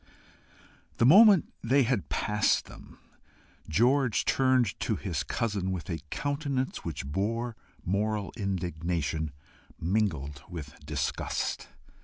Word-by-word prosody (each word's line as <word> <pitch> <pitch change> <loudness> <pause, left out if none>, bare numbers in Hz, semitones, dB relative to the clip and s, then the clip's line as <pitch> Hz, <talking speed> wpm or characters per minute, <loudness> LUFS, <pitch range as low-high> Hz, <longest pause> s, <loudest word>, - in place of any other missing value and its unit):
The - - +4
moment 195 - +7
they 135 +4 +4
had 120 -4 -1
passed 105 +1 +1
them, - - -14 0.7
George 120 - +3
turned 130 -5 +2
to - - 0
his - - -3
cousin 100 -5 -2
with 90 -1 -4
a 80 - -2
countenance 140 - -2
which 75 -5 -4
bore 110 - -2 0.3
moral 105 +2 -1
indignation 85 - -2 0.5
mingled 80 -8 -1
with 80 -5 -7
disgust. 75 -2 -2
100 Hz, 105 wpm, -29 LUFS, 85-125 Hz, 0.7 s, moment